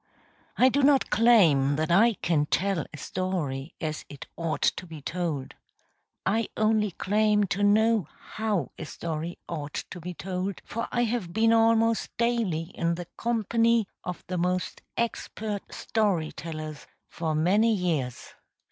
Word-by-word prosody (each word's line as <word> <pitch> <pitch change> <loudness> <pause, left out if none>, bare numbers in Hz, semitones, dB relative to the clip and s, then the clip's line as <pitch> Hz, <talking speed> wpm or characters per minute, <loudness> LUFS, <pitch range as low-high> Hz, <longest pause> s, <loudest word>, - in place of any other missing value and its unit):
I 255 - +6
do 280 +3 +1
not 275 -1 +4
claim 170 - +5
that 155 +2 -1
I 220 +6 +5
can 155 -3 +2
tell 190 -2 0
a 150 - -9
story 160 -5 -3
as 155 -2 -3
it 140 -2 -9
ought 165 -2 -2
to 180 - +1
be 160 -2 -8
told. 160 -3 -3 0.7
I 220 +3 +1
only 215 -1 +2
claim 210 +3 +2
to 200 - -1
know 215 -2 +4 0.2
how 210 - -1
a - - -4
story 165 +1 -4
ought 150 -3 -5 0.2
to 175 - -7
be 180 +2 -6
told, 185 +2 -4
for 230 - -3
I 240 - +2
have 225 -7 -2
been 225 +1 +4
almost 225 0 +3
daily 220 -9 0
in 170 0 0
the 175 +1 -6
company 230 -1 +2 0.2
of 180 - -5
the 180 -1 -3
most 180 +1 -1 0.2
expert 220 -3 -3
story 195 -8 0
tellers 155 -2 -7 0.2
for 160 -2 -2
many 200 +9 +3
years. 165 - -1
185 Hz, 145 wpm, -27 LUFS, 160-220 Hz, 0.7 s, I